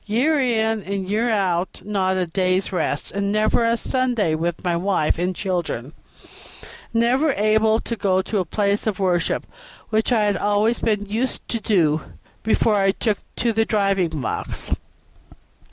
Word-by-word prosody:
Year 270 +9 +2
in 225 -4 +1
and 195 0 -4
year 220 +4 +1
out, 190 -4 -1
not 190 -2 0
a 185 - +1
day's 185 +2 0
rest, 180 - -1
and 200 0 -1
never 215 +2 +2
a 230 0 +2
Sunday 245 -10 0
with 165 +2 -2
my 175 -2 +1
wife 170 -3 +1
and 180 +1 -1
children; 170 - -3 1.0
and 230 0 +2
never 265 +5 +2
able 220 +2 +3
to 235 - -4
go 190 -3 +1
to 210 - -1
a 185 - -1
place 200 +4 0
of 210 -3 0
worship, 180 -3 0 0.5
which 220 +3 +1
I 225 -3 +3
had 205 -2 +1
always 210 +4 +1
been 210 -2 0
used 225 +6 -2
to 230 - -1
do 165 -8 +2 0.4
before 220 -1 +2
I 195 -1 +3
took 215 -1 -1 0.2
to 235 -1 0
the 225 +1 +2
driving 195 -7 0
box. 115 - -4
205 Hz, 165 wpm, -22 LUFS, 185-220 Hz, 1.0 s, able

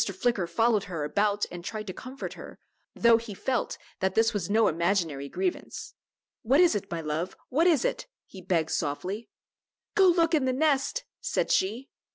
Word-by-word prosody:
Flicker 195 -1 0
followed 225 0 +2
her 170 -5 -4
about 205 +6 +1
and 175 -1 -7
tried 215 +3 -5
to 185 - -5
comfort 260 +6 -7
her, - - -11 0.4
though 235 -1 +5
he 225 -3 -7
felt 255 +5 -1 0.2
that 190 0 0
this 225 +1 +3
was 200 -4 -2
no 220 +1 +4
imaginary 165 -4 0
grievance. 365 - -3 0.5
"What 260 +6 +3
is 355 -1 +6
it, 200 -2 -3
my 170 -1 -3
love; 160 +4 -3
what 320 +7 +3
is 315 -8 +3
it?" - - -2 0.2
he 190 - -12
begged 170 -3 0
softly. 185 +10 -3 0.6
"Go 385 -2 +5
look 335 -1 +3
in 295 -4 +3
the 260 - +1
nest," 300 - +1 0.2
said 485 0 -1
she. 225 +8 0
215 Hz, 180 wpm, -28 LUFS, 180-265 Hz, 0.6 s, is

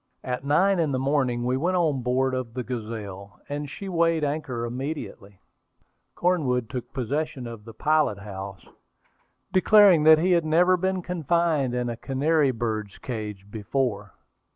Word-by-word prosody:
At 125 0 -3
nine 180 +7 +3
in 155 -4 +1
the - - +1
morning 130 -3 0
we 125 +1 +1
went 180 +6 0
on 155 -7 +1
board 130 +2 +1
of 125 -3 -4
the 125 - -2
Gazelle, 105 -5 -7
and 145 0 -4
she 195 - -8
weighed 165 -3 +1
anchor 140 -5 -2
immediately. 120 -6 -6 0.8
Cornwood 130 -10 0
took 125 -3 -5
possession 135 +2 -3
of 115 -3 -9
the 115 - -10
pilot 155 -6 +2
house, 100 -1 -8 0.9
declaring 195 -3 +6
that 160 0 +8
he 180 +4 +1
had 170 -2 +4
never 175 +4 +4
been 190 0 -1
confined 165 -6 0
in 125 0 -1
a 120 -1 -4
canary 145 +3 +1
bird's 110 -4 -3
cage 105 -5 -6
before. 115 +2 -2
130 Hz, 155 wpm, -25 LUFS, 115-160 Hz, 0.9 s, that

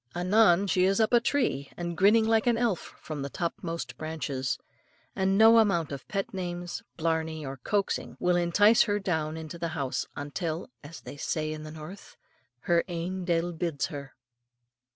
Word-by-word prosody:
Anon, 185 +1 +4
she 180 -1 +2
is 195 +2 +2
up 220 +1 +2
a 240 - +7
tree, 235 - 0
and 175 -1 -3
grinning 215 +5 +5
like 225 +1 +3
an 235 -1 +4
elf 230 -7 -1
from 155 -3 -6
the 140 - -3
topmost 165 -6 -4
branches; 145 -5 -3 0.6
and 190 +1 +2
no 225 +1 +8
amount 195 -8 +2
of 140 - -7
pet 195 -2 -3
names, 175 -2 -4 0.2
blarney, 160 -1 -1
or 135 0 -5
coaxing 200 - -2
will 180 0 +2
entice 200 +6 +5
her 205 -2 +2
down 160 -5 -2
or - - -5
into 160 +2 -8
the 170 - -1
house 135 -2 -2
until, 155 - -4
as 155 +3 -10
they - - -9
say 155 +1 -2
in 155 - -7
the 155 - -8
north, 160 +5 -10 0.4
her 170 +3 +2
ain 180 +1 -4
de'il 175 0 0
bids 160 -3 -1
her. 140 -2 -8
170 Hz, 175 wpm, -28 LUFS, 155-195 Hz, 0.6 s, no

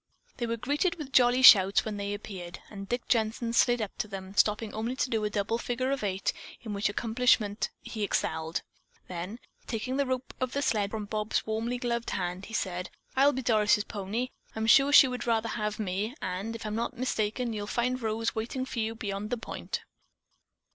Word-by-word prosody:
They 240 - -2
were 230 0 -1
greeted 290 - 0
with 295 -5 -7
jolly 250 0 +5
shouts 195 -5 +8
when 215 -2 -3
they 200 0 -2
appeared, 185 -4 -7
and 195 -2 -8
Dick 245 0 -2
Jensen 230 0 0
slid 240 -1 +4
up 205 - -6
to - - -1
them, 195 -1 -7
stopping 210 +1 +2
only 225 +4 -2
to 260 -1 0
do 220 -2 +1
a 210 - +1
double 210 +2 -1
figure 255 +3 -1
eight, 195 -1 -1 0.3
in 220 -4 -5
which 200 0 +1
accomplishment 225 -1 +2
he 220 - -6
excelled. 160 -5 -1 0.4
Then, 180 +5 -5 0.3
taking 250 +3 -2
the 280 -1 +1
rope 255 0 -3
of 255 -1 -2
the 280 - 0
sled 205 -5 +1
from 215 0 -4
Bob's 215 +1 -1
warmly 225 +3 -1
gloved 235 -1 -2
hand, 180 0 -3
he 225 - -11
said: 180 -2 -2 0.3
"I'll 275 +2 +6
be 260 -1 -4
Doris' 210 -3 +3
pony. 215 +5 -3 0.3
I'm 220 0 -1
sure 275 +5 +6
she 290 -2 +9
would 250 -1 -4
rather 230 -1 +1
have 210 -1 -2
me, 210 +4 -2
and, 195 +5 -3
if 225 - -7
I'm 210 - -3
not 235 +3 -2
mistaken, 235 -1 -1
you'll 205 -1 -4
find 250 +3 0
Rose 225 0 -1
waiting 235 +4 -3
for 250 - -5
you 225 0 -1
beyond 205 -1 -4
the 245 - -1
point." 230 - -5
220 Hz, 195 wpm, -29 LUFS, 205-245 Hz, 0.4 s, she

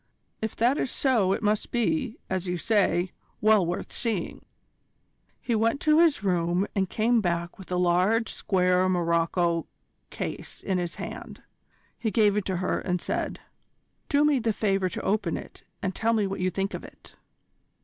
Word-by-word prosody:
"If 220 -1 -3
that 245 +5 +2
is - - -1
so 235 -10 +2
it 195 - -1
must 210 0 +1
be, 250 +1 0
as 185 -1 -2
you 180 0 -1
say, 190 -2 +1 0.3
well 215 -2 +5
worth 175 +1 -3
seeing." 220 -8 -3 1.0
He 240 - -2
went 230 +5 +2
to 305 0 +4
his 325 -9 +4
room 175 0 +1
and 190 -2 +1
came 230 +1 +2
back 170 -1 -2
with 190 - -11
a - - +1
large 180 +6 +2
square 185 -1 +2
morocco 170 -1 +1 0.4
case - - -6
in 190 -2 0
his 175 -1 -3
hand. - - -8 0.6
He 225 - 0
gave 210 -1 +3
it 210 -2 0
to 190 -2 -1
her, 185 +1 0
and 180 -1 -1
said: - - -3 0.7
"Do 290 0 +4
me 295 -3 +3
the 225 -2 0
favour 195 -3 +1
to 225 +5 -5
open 210 +2 0
it, - - -11 0.2
and 190 -1 -1
tell 230 +4 +1
me 215 -3 +2
what 195 0 -3
you 185 0 +1
think 195 +3 -2
of - - -5
it." - - -14
195 Hz, 175 wpm, -27 LUFS, 180-225 Hz, 1.0 s, well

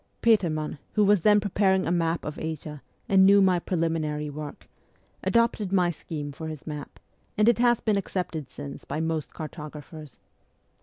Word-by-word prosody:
Petermann, 160 -10 +2
who 210 - +3
was 205 -2 +4
then 210 +3 +5
preparing 190 -2 +2
a - - 0
map 165 -1 0
of 150 - -5
Asia, 155 -2 -5 0.3
and 195 -1 +5
knew 200 +1 +7
my 185 -2 +4
preliminary 160 -4 -1
work, 150 0 -8 0.6
adopted 230 -4 +1
my 180 -3 +3
scheme 150 -2 -6
for 160 +3 -7
his 155 -2 -7
map, 150 -2 -7 0.4
and 210 +1 +4
it 235 -1 +4
has 240 -1 +3
been 215 -3 +1
accepted 175 -7 -3
since 145 -1 -8
by 150 - -4
most 160 -2 -2
cartographers. 150 -2 -9
165 Hz, 160 wpm, -26 LUFS, 150-195 Hz, 0.6 s, knew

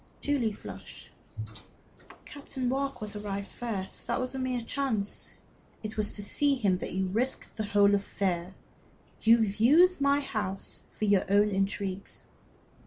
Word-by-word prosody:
Julie 270 -6 +1
flushed. - - -10 1.1
"Captain 275 -3 -5
Warkworth 265 -6 -2
arrived 200 -1 -4
first; 210 -6 -5
that - - 0
was 255 +1 -3
a 265 - -4
mere 255 -2 -1
chance." 230 -6 -1 0.5
"It 215 0 -5
was 210 -1 +1
to 205 - 0
see 285 +7 +3
him 200 -8 +1
that - - -5
you 190 0 0
risked 230 +8 -2
the 215 - -2
whole 205 0 +4
affair. 190 -2 -1 0.7
You 230 0 +6
have 205 -1 -2
used 315 +9 +5
my 280 +1 +4
house 210 -8 -4
for 215 - -3
your 200 -2 +3
own 205 +1 +5
intrigues." 195 0 -2
215 Hz, 145 wpm, -29 LUFS, 200-260 Hz, 1.1 s, You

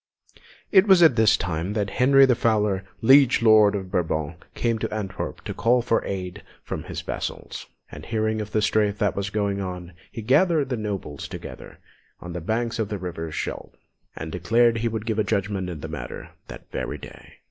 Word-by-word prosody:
It 195 +1 +6
was 190 -3 +6
just 165 - +8
at - - -10
this 110 -2 +4
time 85 +3 -3
that 105 -2 -2
Henry 135 +2 +5
the 130 - +4
Fowler, 105 -4 +1 0.2
Liege 135 -1 +6
Lord 110 -2 +6
of 95 -2 -5
Brabant, 80 -1 -2
came 115 -2 0
to - - -3
Antwerp 105 -3 -5
to - - -5
call 120 +1 +2
for 115 -1 +1
aid 90 -2 -5 0.2
from - - -5
his - - -5
vassals; - - -6 0.2
and - - -9
hearing 110 -1 -1
of 105 - -6
the 110 - +1
strife 105 -1 +1
that 105 -1 0
was 100 0 -2
going 100 -1 -1
on, 90 -2 -6 0.2
he 115 - -7
gathered 150 - +3
the 125 - -1
nobles 100 - -5
together - - -9 0.4
on 85 0 -8
the 90 - -5
banks 115 +5 -2
of 110 -2 -1
the 105 - -3
river 85 -3 -5
Scheldt, - - -5 0.4
and 80 0 -6
declared 115 +7 +2
he 115 - 0
would 110 -1 -4
give 110 -1 0
judgment 100 -3 -1
in 80 -4 -7
the - - -5
matter - - -7 0.2
that - - -12
very - - -4
day. - - -13
105 Hz, 195 wpm, -24 LUFS, 95-115 Hz, 0.4 s, just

